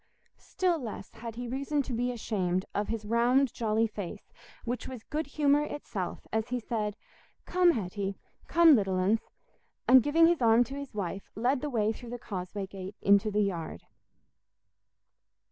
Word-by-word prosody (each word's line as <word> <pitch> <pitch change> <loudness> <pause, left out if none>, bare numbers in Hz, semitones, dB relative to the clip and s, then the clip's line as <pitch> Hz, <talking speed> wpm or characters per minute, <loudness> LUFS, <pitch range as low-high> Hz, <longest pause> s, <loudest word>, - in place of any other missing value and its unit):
Still 360 -3 0
less 220 -6 -7
had 230 0 -8
he 245 +1 -5
reason 275 +3 -1
to 255 - -5
be 245 +2 0
ashamed 185 -6 -1
of 205 0 -1
his 225 -2 -3
round 240 +4 +3
jolly 220 0 +1
face, 205 -2 -7 0.3
which 245 +1 -3
was 250 -4 -8
good 305 -1 -3
humour 290 0 +3
itself 235 -11 -5
as 220 0 0
he 250 0 -1
said, 215 -2 -3 0.5
"Come, 360 0 +4
Hetty—come, 205 - +2
little 195 -4 +1
uns!" 195 +5 +2 0.7
and 260 0 +8
giving 315 +5 +4
his 335 -3 +3
arm 230 +1 +6
to 265 - -9
his 280 -5 -7
wife, 195 -1 -4
led 250 +5 +1
the 295 - -2
way 220 -4 +1
through 240 +1 -10
the 245 - -5
causeway 195 -2 -5
gate 190 +1 -8
into 200 +1 +5
the 210 0 +1
yard. 165 - -4
230 Hz, 160 wpm, -29 LUFS, 205-265 Hz, 0.7 s, and